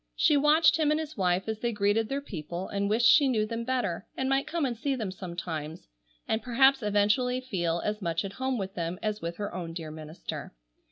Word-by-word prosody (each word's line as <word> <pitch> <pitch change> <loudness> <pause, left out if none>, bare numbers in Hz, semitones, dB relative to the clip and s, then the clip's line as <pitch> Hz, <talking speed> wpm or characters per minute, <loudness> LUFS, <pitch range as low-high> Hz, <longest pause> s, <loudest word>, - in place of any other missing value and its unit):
She 305 - +4
watched 305 +2 +5
him 310 -2 +2
and 305 +1 +2
his 310 -1 -5
wife 185 -1 +1
as 220 -1 -3
they 240 +1 0
greeted 210 +1 +1
their 275 +1 -1
people, 175 - -6
and 200 0 -1
wished 225 +3 +2
she 280 +4 +7
knew 220 -5 +2
them 230 +2 -4
better, 245 -9 -2
and 265 - 0
might 270 +1 +1
come 335 -3 -1
and 245 -3 -1
see 270 +4 -1
them 215 -7 -3
sometimes, 170 -4 -6 0.4
and 220 0 0
perhaps 265 +2 +4
eventually 210 +5 +2
feel 175 -9 -1
as 210 0 -2
much 170 0 -1
at 195 - -6
home 260 -1 0
with 195 -2 -4
them 170 0 -3
as 215 -1 -2
with 170 +1 -4
her 205 -1 -4
own 170 -2 -5
dear 165 -2 -6
minister. 155 - -7
215 Hz, 220 wpm, -28 LUFS, 180-260 Hz, 0.4 s, she